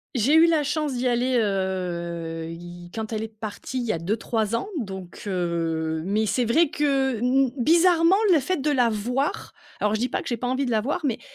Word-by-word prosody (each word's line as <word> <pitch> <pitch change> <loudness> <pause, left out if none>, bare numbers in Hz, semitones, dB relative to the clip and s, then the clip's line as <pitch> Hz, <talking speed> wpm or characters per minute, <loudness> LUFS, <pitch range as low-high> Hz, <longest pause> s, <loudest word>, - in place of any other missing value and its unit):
j'ai 250 +5 +2
eu 320 +1 +7
la 320 -3 +2
chance 295 0 -1
d'y 250 +1 0
aller, 245 +1 +1
heu, 170 -5 -2
il 175 +1 -9
quand 220 0 -4
elle 215 - -2
est 220 - -3
partie, 220 +3 -7
il 245 - -1
y 220 - 0
a 165 - -3
2-3 220 +4 -1
ans 315 - -2
donc 190 -6 -7
heu, 165 -3 -1
mais 210 +4 0
c'est 245 +3 +1
vrai 310 +7 +3
que 270 -4 +1
n 260 +1 +3
bizarrement, 335 +5 +4 0.2
le 320 - +5
fait 370 +7 -1
de 295 +1 0
la 250 -4 +3
voir, 245 +6 -2 0.3
alors 210 0 +1
je 215 - 0
dis 250 - 0
pas - - -2
que - - -9
j'ai 240 - 0
pas 245 - -3
envie 260 +2 0
de 245 - -2
la 220 -2 +2
voir, 295 +9 -2
mais 250 -6 -1
230 Hz, 220 wpm, -24 LUFS, 190-270 Hz, 0.3 s, eu